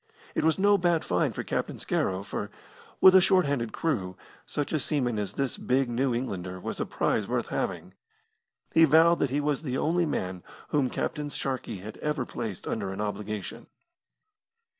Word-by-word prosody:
It -, -, 0 dB
was 160 Hz, 0 st, +3 dB
no 200 Hz, +1 st, +4 dB
bad 175 Hz, -2 st, +2 dB
find 90 Hz, -, +1 dB
for -, -, -3 dB
Captain -, -, -2 dB
Scarrow, 95 Hz, 0 st, -1 dB
for, -, -, -4 dB, 0.5 s
with 190 Hz, -, +9 dB
a 190 Hz, -, +8 dB
short 185 Hz, -1 st, +4 dB
handed 125 Hz, -6 st, -1 dB
crew, 95 Hz, -, -2 dB, 0.3 s
such 145 Hz, +2 st, -3 dB
a 155 Hz, -, +2 dB
seaman 125 Hz, -7 st, 0 dB
as 100 Hz, -1 st, -3 dB
this 135 Hz, 0 st, -2 dB
big 130 Hz, -1 st, +1 dB
New 130 Hz, +2 st, +1 dB
Englander 95 Hz, -7 st, -4 dB
was -, -, -5 dB
a -, -, -1 dB
prize -, -, 0 dB
worth -, -, -1 dB
having. 90 Hz, 0 st, -3 dB, 0.8 s
He 165 Hz, -, +6 dB
vowed 165 Hz, +3 st, +5 dB
that -, -, +1 dB
he 140 Hz, +3 st, 0 dB
was 145 Hz, -1 st, 0 dB
the 130 Hz, -4 st, -2 dB
only 170 Hz, +3 st, +1 dB
man 90 Hz, -9 st, -3 dB, 0.3 s
whom 140 Hz, -4 st, +2 dB
Captain 150 Hz, +3 st, -3 dB
Sharkey 130 Hz, -8 st, -3 dB
had 105 Hz, +3 st, -8 dB
ever 150 Hz, -4 st, -2 dB
placed 110 Hz, -7 st, -5 dB
under 100 Hz, -3 st, -2 dB
an 95 Hz, -, -6 dB
obligation. 105 Hz, -1 st, -4 dB
130 Hz, 180 wpm, -28 LUFS, 105-155 Hz, 0.8 s, with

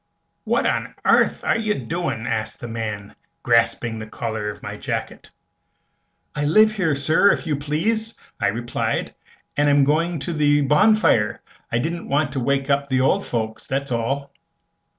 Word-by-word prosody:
"What -, -, +1 dB
on -, -, -1 dB
airth -, -, +3 dB
air -, -, +1 dB
you 215 Hz, -2 st, 0 dB
a -, -, -5 dB
doin'?" 130 Hz, -2 st, -3 dB
asked 110 Hz, -3 st, -3 dB
the 120 Hz, -, -6 dB
man, 110 Hz, -3 st, -5 dB, 0.3 s
grasping 115 Hz, -1 st, +2 dB
the 110 Hz, -, -7 dB
collar 110 Hz, -1 st, -4 dB
of -, -, -9 dB
my -, -, -5 dB
jacket. -, -, -5 dB, 1.0 s
"I 145 Hz, -, -2 dB
live 215 Hz, +8 st, +5 dB
here, 185 Hz, -9 st, 0 dB
sir, 160 Hz, +8 st, +4 dB
if -, -, -2 dB
you 155 Hz, -3 st, 0 dB
please," 185 Hz, +11 st, -1 dB, 0.2 s
I -, -, +1 dB
replied, 120 Hz, +3 st, -2 dB, 0.4 s
"and 145 Hz, 0 st, +3 dB
am 145 Hz, 0 st, +5 dB
going 165 Hz, +4 st, +1 dB
to 170 Hz, -, -3 dB
the 145 Hz, -1 st, +3 dB
bonfire. 150 Hz, -, +3 dB, 0.3 s
I 115 Hz, -, +1 dB
didn't 165 Hz, +7 st, -3 dB
want 145 Hz, 0 st, +1 dB
to 135 Hz, -, -2 dB
wake 135 Hz, +2 st, 0 dB
up 140 Hz, 0 st, +1 dB
the 130 Hz, -1 st, +2 dB
old 130 Hz, -, +2 dB
folks, 110 Hz, -2 st, -3 dB
that's 140 Hz, 0 st, -2 dB
all." 135 Hz, +4 st, -2 dB
140 Hz, 170 wpm, -22 LUFS, 115-160 Hz, 1.0 s, live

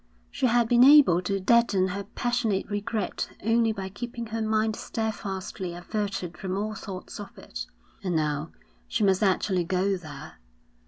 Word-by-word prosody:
She 260 Hz, -, +1 dB
had 240 Hz, -1 st, +3 dB
been 240 Hz, +1 st, +6 dB
able 270 Hz, -, +7 dB
to 195 Hz, +2 st, -1 dB
deaden 200 Hz, -2 st, +3 dB
her 200 Hz, +2 st, -4 dB
passionate 230 Hz, -2 st, -1 dB
regret 205 Hz, +1 st, -2 dB
only 225 Hz, +1 st, +3 dB
by 195 Hz, -3 st, -5 dB
keeping 235 Hz, +3 st, -6 dB
her 225 Hz, 0 st, -4 dB
mind 220 Hz, 0 st, +1 dB
steadfastly 195 Hz, -6 st, -4 dB
averted 190 Hz, -1 st, -4 dB
from 190 Hz, 0 st, -3 dB
all 215 Hz, +2 st, -2 dB
thoughts 195 Hz, -3 st, -7 dB
of 205 Hz, -, -9 dB
it, -, -, -7 dB, 0.4 s
and 180 Hz, -3 st, -1 dB
now 150 Hz, 0 st, 0 dB, 0.4 s
she 220 Hz, -, 0 dB
must 195 Hz, -1 st, +3 dB
actually 190 Hz, -2 st, +2 dB
go 190 Hz, +2 st, +1 dB
there. 155 Hz, -3 st, -10 dB
200 Hz, 155 wpm, -27 LUFS, 185-225 Hz, 0.4 s, able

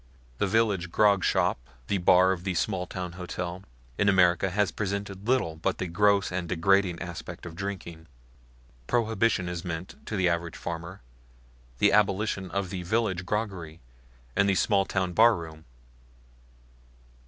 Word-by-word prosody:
The -, -, +2 dB
village 100 Hz, -4 st, +1 dB
grogshop, 100 Hz, -2 st, +3 dB, 0.3 s
the 100 Hz, -, -1 dB
bar 90 Hz, +1 st, +5 dB
of 90 Hz, -2 st, -3 dB
the 95 Hz, -1 st, -2 dB
smalltown 90 Hz, -1 st, -2 dB
hotel, 90 Hz, 0 st, -5 dB, 0.4 s
in 100 Hz, -, +4 dB
America 90 Hz, -1 st, +4 dB
has 100 Hz, -1 st, +1 dB
presented 100 Hz, +1 st, -4 dB
little 120 Hz, -11 st, +1 dB
but 80 Hz, -, -1 dB
the 95 Hz, -, -3 dB
gross 100 Hz, +3 st, +2 dB
and 90 Hz, -2 st, -3 dB
degrading 95 Hz, 0 st, +2 dB
aspect 85 Hz, 0 st, -7 dB
of 85 Hz, -2 st, -8 dB
drinking. 85 Hz, -4 st, -6 dB, 0.8 s
Prohibition 110 Hz, -5 st, +1 dB
has 85 Hz, -1 st, -4 dB
meant, 85 Hz, 0 st, -6 dB
to 110 Hz, -, -3 dB
the 95 Hz, -2 st, +2 dB
average 85 Hz, -1 st, -1 dB
farmer, 85 Hz, +2 st, -6 dB, 0.8 s
the -, -, +4 dB
abolition 100 Hz, -2 st, +1 dB
of 100 Hz, -2 st, -3 dB
the 95 Hz, -, -4 dB
village 95 Hz, -2 st, -1 dB
groggery 95 Hz, -7 st, -3 dB, 0.6 s
and 100 Hz, 0 st, +3 dB
the 100 Hz, -, +3 dB
small 100 Hz, 0 st, +2 dB
town 95 Hz, -2 st, -1 dB
barroom. 85 Hz, -8 st, +2 dB
95 Hz, 140 wpm, -27 LUFS, 85-100 Hz, 0.8 s, bar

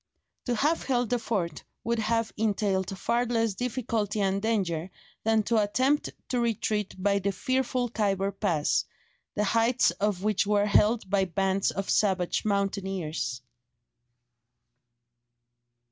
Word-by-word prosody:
To 245 Hz, -, 0 dB
have 300 Hz, +8 st, +1 dB
held 245 Hz, -3 st, 0 dB
the 245 Hz, -, +2 dB
fort 185 Hz, -8 st, -2 dB, 0.2 s
would 235 Hz, 0 st, 0 dB
have 225 Hz, +1 st, 0 dB
entailed 200 Hz, -3 st, 0 dB
far 235 Hz, +5 st, +1 dB
less 230 Hz, -2 st, +1 dB
difficulty 225 Hz, -2 st, -2 dB
and 195 Hz, 0 st, +1 dB
danger 190 Hz, -6 st, -1 dB, 0.3 s
than 220 Hz, -1 st, +3 dB
to 225 Hz, 0 st, +2 dB
attempt 260 Hz, +8 st, +1 dB, 0.2 s
to 250 Hz, -, 0 dB
retreat 215 Hz, -3 st, -1 dB
by 200 Hz, +1 st, +1 dB
the 200 Hz, +1 st, 0 dB
fearful 255 Hz, +4 st, 0 dB
Khyber 200 Hz, -4 st, 0 dB
pass, 180 Hz, -7 st, 0 dB, 0.5 s
the 210 Hz, -, +1 dB
heights 230 Hz, +1 st, +3 dB
of 200 Hz, +1 st, -1 dB
which 210 Hz, -1 st, +1 dB
were 205 Hz, 0 st, +3 dB
held 210 Hz, +1 st, +3 dB
by 195 Hz, 0 st, +2 dB
bands 195 Hz, +1 st, 0 dB
of 195 Hz, 0 st, -3 dB
savage 190 Hz, -4 st, +1 dB
mountaineers. 190 Hz, -, -2 dB
210 Hz, 130 wpm, -28 LUFS, 195-230 Hz, 0.5 s, than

